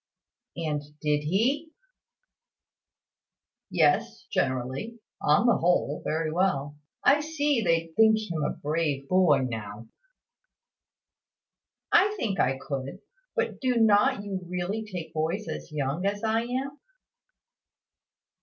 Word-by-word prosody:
"And 155 -3 -2 0.2
did 150 -1 +1
he?" 265 - 0 2.0
"Yes, - - +2
generally. 130 - -2 0.2
On 150 +10 +3
the 235 - +4
whole, 170 -4 +1
very 155 0 -1
well. 150 -5 0 0.3
I 285 +1 +5
see 295 -4 0
they 165 -3 0
think 220 0 +6
him 175 -8 -3
a - - +1
brave 150 -2 -2
boy 180 -7 +4
now." 110 -1 -7 2.0
"I 415 +1 +4
think 200 - -2
I 130 +1 +2
could. 140 +7 -5 0.3
But - - -1
do 255 -2 +1
not 210 -2 +4
you 195 -2 -4
really 180 +5 -2
take 165 -3 -6
boys 165 +7 -2
as - - -6
young 145 +3 -2
as 205 +1 -2
I 225 +1 +1
am?" 265 +4 -4
180 Hz, 115 wpm, -27 LUFS, 150-220 Hz, 2.0 s, think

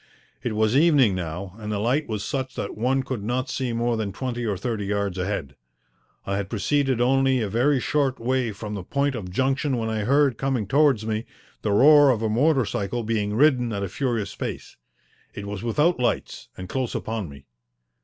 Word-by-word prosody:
It 120 - -2
was 110 +2 +2
evening 145 - +5
now 90 +1 -5
and 105 -1 -5
the 105 - -1
light 125 +9 0
was 105 -2 -3
such 130 -1 -3
that - - -4
one 130 +4 +1
could 130 -5 -4
not 125 +4 -2
see 130 -2 -2
more 115 0 0
than 105 -3 -2
twenty 120 +1 -4
or 100 -3 -1
thirty 105 0 -3
yards 100 -2 -1
ahead. 90 -7 -3 0.7
I 100 0 -1
had 100 -1 -3
proceeded 130 +4 +1
only 135 +1 +3
a 110 - -1
very 125 +7 +2
short 135 0 0
way 125 -1 0
from 105 +1 -7
the 100 - -4
point 140 +9 0
of 105 -7 -5
junction 130 +5 0
when 110 -1 -2
I 110 - -1
heard, 140 0 +3
coming 135 -5 0
towards 135 -2 +3
me, 110 0 -2 0.3
the 105 - -1
roar 145 +6 +7
of 115 -4 +1
a 110 - +1
motor 135 +3 +3
cycle 105 +4 -3
being 105 -2 -1
ridden 125 -3 +3
at 100 -2 -2
a 100 - -3
furious 120 -2 -2
pace. - - -6 0.6
It 100 - -6
was 100 -1 -5
without 150 +8 +1
lights, 120 -1 -2
and 95 - -7
close 130 +3 -3
upon 110 -6 -3
me. 70 -1 -13
115 Hz, 200 wpm, -24 LUFS, 105-135 Hz, 0.7 s, roar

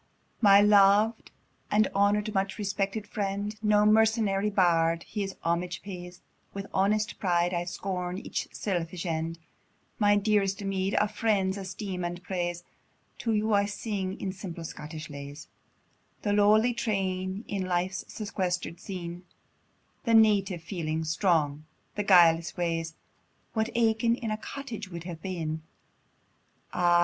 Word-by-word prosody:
My 200 -2 +8
lov'd, 210 +2 +5 0.4
my 210 +1 +5
honour'd, 205 +2 +2
much 195 -1 -1
respected 200 +1 -2
friend! 205 +1 -3
No 210 -1 +4
mercenary 215 -2 +3
bard 165 -4 +2
his 200 -3 -4
homage 175 +2 -1
pays; 180 -2 -8 0.3
With 195 0 -4
honest 210 +3 +1
pride, 175 -2 +1
I 175 0 -1
scorn 180 0 -3
each - - -4
selfish 175 -2 -3
end, 165 0 -2 0.6
My 205 -1 +5
dearest 200 -2 +2
meed, 195 0 -1
a 210 - +3
friend's 205 -3 0
esteem 190 -1 -5
and 175 +1 -4
praise: 175 -2 -3 0.6
To 230 - -1
you 215 +1 +1
I 200 0 +4
sing, 200 -2 -4
in 190 -1 -3
simple 180 -3 -7
Scottish 155 -1 -7
lays, 145 +1 -9 0.7
The 205 - +1
lowly 215 +4 +4
train 195 -3 -2
in 195 -2 -2
life's 185 +1 -1
sequester'd 185 -5 -3
scene, 175 -2 -6 0.8
The 230 -2 +4
native 200 -5 +4
feelings 160 -2 -2
strong, 155 -4 +1 0.3
the 210 - -2
guileless 170 -4 +5
ways, 165 -2 -2 0.6
What 220 0 0
Aiken 230 0 +3
in 230 -3 -4
a 215 - -1
cottage 225 -4 -7
would 170 -2 -7
have 170 -2 -7
been; 160 -4 -3 1.1
Ah! 175 -1 +4
195 Hz, 135 wpm, -28 LUFS, 175-210 Hz, 1.1 s, My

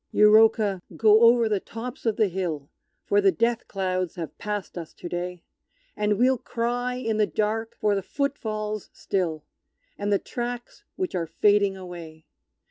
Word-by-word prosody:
Euroka, 210 -2 +5 0.2
go 220 0 +6
over 235 0 +6
the 210 -2 +1
tops 245 +6 -7
of 220 - +2
the 215 - +3
hill, 170 -6 -4 0.3
For 205 0 +3
the 195 -1 +5
Death 230 +2 0
clouds 185 -2 -2
have 165 -3 -6
passed 210 -2 -4
us 170 -3 -7
to - - -8
day, 175 0 -4 0.5
And 210 -1 +1
we'll 255 +2 +3
cry 245 0 -2
in 225 -4 -2
the 210 -1 +3
dark 220 +1 -1
for 210 -1 +2
the 195 - 0
foot 280 +8 -2
falls 215 -3 -4
still, 170 -6 -2 0.6
And 205 0 -1
the 200 - +5
tracks 240 +2 -6
which 370 -1 -3
are 170 -2 -1
fading 200 +3 +3
away! 170 -4 -10
210 Hz, 165 wpm, -25 LUFS, 185-230 Hz, 0.6 s, go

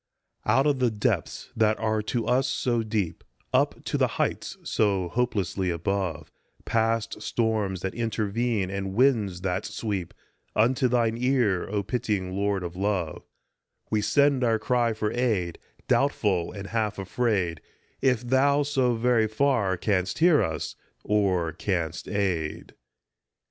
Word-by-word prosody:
OUT 135 - +4
of 145 -3 +2
the 125 -2 +3
depths 105 -2 -2
that 110 -1 +3
are 110 -1 0
to 115 +2 -2
us 130 +3 +2
so 120 -2 0
deep, 105 - -2 0.3
Up - - +1
to - - -2
the - - +4
heights - - -1
so 95 -4 +1
hopelessly 100 -4 -1
above, 90 -1 -2 0.3
Past 115 0 0
storms 110 -5 -1
that 95 - -3
intervene 110 -2 -1
and 95 -1 -3
winds 110 -8 +2
that 95 +1 -1
sweep, 100 -6 -4 0.4
Unto 125 +4 +3
thine 115 -2 +1
ear, 125 -8 +1
O 100 0 -1
pitying 100 -4 -2
Lord 100 -1 0
of 85 0 -6
love, 95 -4 -1 0.7
We 110 - +2
send 140 +4 +3
our 115 -2 +3
cry 120 0 +1
for 110 -1 -2
aid, 105 -9 0 0.3
doubtful 105 -11 +1
and 100 -1 -7
half 110 -2 -1
afraid 95 -4 -1 0.4
If 125 -3 +2
thou, 140 +3 +3
so 130 -4 +1
very 115 -1 +2
far, 110 -5 +1
canst 90 -1 0
hear 165 -2 +5
us 80 -1 -3 0.3
or 95 -5 +1
canst 85 -4 -2
aid. 90 -7 -2
105 Hz, 140 wpm, -26 LUFS, 95-120 Hz, 0.7 s, hear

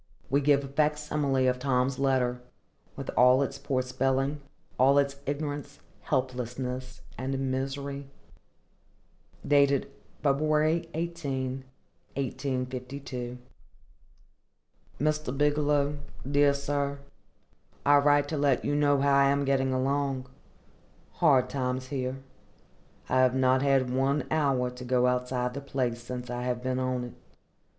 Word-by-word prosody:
We 140 +1 +3
give 140 0 +3
a - - -6
facsimile 150 -2 +1
of 125 0 +1
Tom's 130 0 0
letter, 130 -2 +1 0.5
with - - -5
all 125 +2 +6
its 135 - -5
poor 130 -2 -1
spelling, 135 +3 0 0.4
all 135 +2 +5
its 140 -1 +2
ignorance, 145 0 -4 0.2
helplessness, 130 -1 -3 0.2
and 135 +1 -2
misery. 140 +1 -4 1.4
[February 145 +3 +1
18, 135 -6 -3 0.5
1852. 130 -1 -4 1.6
MR. 150 -3 -1
BIGELOW. 145 0 +2 0.3
DEAR 145 0 +4
SIR:—I 140 0 -2
write 145 0 +3
to 155 - -2
let 140 -3 +2
you - - 0
know 145 -1 +3
how 140 0 +3
I 140 0 +5
am 140 0 +1
getting 135 -1 +1
along. 135 0 0 0.9
Hard 135 -6 +3
times 130 -1 -3
here. 130 -2 -2 0.9
I 130 - +2
have 130 0 +4
not 130 0 +3
had 135 -2 +2
one 135 +2 +1
hour 135 -5 +1
to 125 0 -9
go 125 0 +2
outside 125 0 0
the 140 - -5
place 125 -4 -2
since 125 0 -6
I 120 0 -3
have 125 0 -2
been 130 0 -1
on 130 -1 -1
it. 120 - -7
135 Hz, 120 wpm, -28 LUFS, 130-140 Hz, 1.6 s, all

